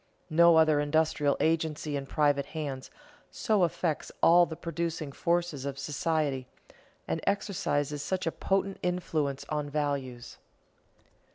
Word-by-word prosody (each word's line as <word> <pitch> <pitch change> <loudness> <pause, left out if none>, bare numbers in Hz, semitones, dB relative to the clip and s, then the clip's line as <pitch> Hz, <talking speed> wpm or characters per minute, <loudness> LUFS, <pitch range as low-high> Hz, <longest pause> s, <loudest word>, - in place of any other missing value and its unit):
No 170 +1 +6
other 155 -2 +5
industrial 145 -1 +1
agency 160 -2 0
in 140 -1 -4
private 145 -1 +1
hands 135 -4 -4 0.4
so 215 -5 0
affects 165 -2 -1
all 175 +1 +7
the 160 - -6
producing 165 -3 -4
forces 170 -2 -1
of 140 -1 -4
society 145 -3 -1 0.6
and 80 - -2
exercises 150 -8 -1
such 185 +4 -2
a 165 - 0
potent 195 +2 -1
influence 160 -6 -2
on 150 -1 -2
values. 140 -5 -3
155 Hz, 120 wpm, -29 LUFS, 145-170 Hz, 0.6 s, all